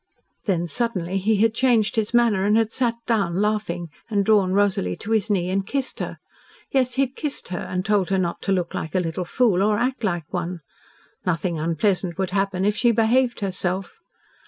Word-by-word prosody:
Then, 175 Hz, -5 st, +1 dB
suddenly, 195 Hz, -3 st, -1 dB
he 215 Hz, +3 st, +2 dB
had 225 Hz, -1 st, +3 dB
changed 235 Hz, -3 st, +2 dB
his 220 Hz, -2 st, 0 dB
manner 235 Hz, -5 st, +3 dB
and 210 Hz, +2 st, +3 dB
had 225 Hz, -1 st, +1 dB
sat 240 Hz, -2 st, 0 dB
down, 200 Hz, -8 st, +1 dB
laughing, 205 Hz, -5 st, -1 dB, 0.2 s
and 200 Hz, -3 st, +1 dB
drawn 200 Hz, -4 st, +4 dB
Rosalie 190 Hz, -, +1 dB
to 210 Hz, -, -7 dB
his 220 Hz, -1 st, +2 dB
knee 185 Hz, -3 st, +1 dB
and 195 Hz, +1 st, 0 dB
kissed 270 Hz, +6 st, -3 dB
her -, -, -4 dB, 0.5 s
yes, 255 Hz, -2 st, +1 dB
he 270 Hz, -, +3 dB
had 265 Hz, 0 st, -4 dB
kissed 295 Hz, -2 st, -4 dB
her 180 Hz, -, -3 dB
and 185 Hz, 0 st, -3 dB
told 205 Hz, -4 st, +2 dB
her 195 Hz, -, +2 dB
not 175 Hz, -2 st, -1 dB
to 195 Hz, -, -1 dB
look 180 Hz, -3 st, 0 dB
like 160 Hz, -, -4 dB
a -, -, +4 dB
little 175 Hz, +1 st, -2 dB
fool 205 Hz, -1 st, +2 dB
or 210 Hz, +1 st, +3 dB
act 250 Hz, +1 st, -1 dB
like 175 Hz, -7 st, -2 dB
one. 175 Hz, -1 st, -3 dB, 0.6 s
Nothing 170 Hz, -2 st, -1 dB
unpleasant 170 Hz, +2 st, 0 dB
would 190 Hz, -1 st, -1 dB
happen 195 Hz, -1 st, 0 dB
if 210 Hz, 0 st, +2 dB
she 240 Hz, +2 st, +3 dB
behaved 235 Hz, +2 st, +2 dB
herself. 185 Hz, -1 st, -3 dB
200 Hz, 200 wpm, -23 LUFS, 180-225 Hz, 0.6 s, drawn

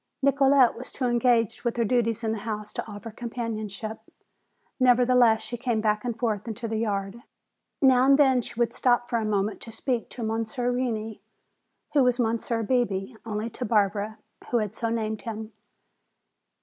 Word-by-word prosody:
Nicolete 275 Hz, -2 st, +5 dB
was 250 Hz, +2 st, -7 dB
too 260 Hz, -, -3 dB
engaged 240 Hz, -2 st, +2 dB
with 240 Hz, -1 st, -1 dB
her 235 Hz, -, +2 dB
duties 230 Hz, 0 st, +1 dB
in 220 Hz, -, 0 dB
the 220 Hz, -, -2 dB
house 210 Hz, 0 st, -5 dB
to -, -, -4 dB
offer 205 Hz, +2 st, -8 dB
companionship. 220 Hz, -2 st, -5 dB, 0.8 s
Nevertheless, 245 Hz, -2 st, +4 dB
she 240 Hz, -, -5 dB
came 235 Hz, -2 st, 0 dB
back 215 Hz, -1 st, +1 dB
and 240 Hz, -2 st, -3 dB
forth 220 Hz, -3 st, -1 dB
into 230 Hz, +1 st, -4 dB
the 220 Hz, 0 st, -2 dB
yard. 200 Hz, 0 st, -2 dB, 0.6 s
Now 260 Hz, -1 st, +6 dB
and 275 Hz, 0 st, +6 dB
then 265 Hz, -4 st, +4 dB
she 235 Hz, -, -8 dB
would 235 Hz, -1 st, +1 dB
stop 240 Hz, -1 st, +1 dB
for 235 Hz, -, +2 dB
a 220 Hz, -, -2 dB
moment 205 Hz, -1 st, -1 dB
to 230 Hz, -, -8 dB
speak 240 Hz, +1 st, -2 dB
to 240 Hz, -, -7 dB
Monsieur 225 Hz, +3 st, -1 dB
Reney, 225 Hz, -4 st, -2 dB, 0.7 s
who 290 Hz, -, +5 dB
was 250 Hz, 0 st, +2 dB
Monsieur 230 Hz, 0 st, 0 dB
Bebé 225 Hz, -3 st, 0 dB
only 215 Hz, +1 st, -3 dB
to 250 Hz, -, -5 dB
Barbara, 210 Hz, -1 st, +1 dB, 0.3 s
who 240 Hz, -, +2 dB
had 210 Hz, -3 st, -1 dB
so 230 Hz, +1 st, -2 dB
named 220 Hz, -2 st, -2 dB
him. 220 Hz, -1 st, -6 dB
230 Hz, 175 wpm, -26 LUFS, 215-245 Hz, 0.8 s, Now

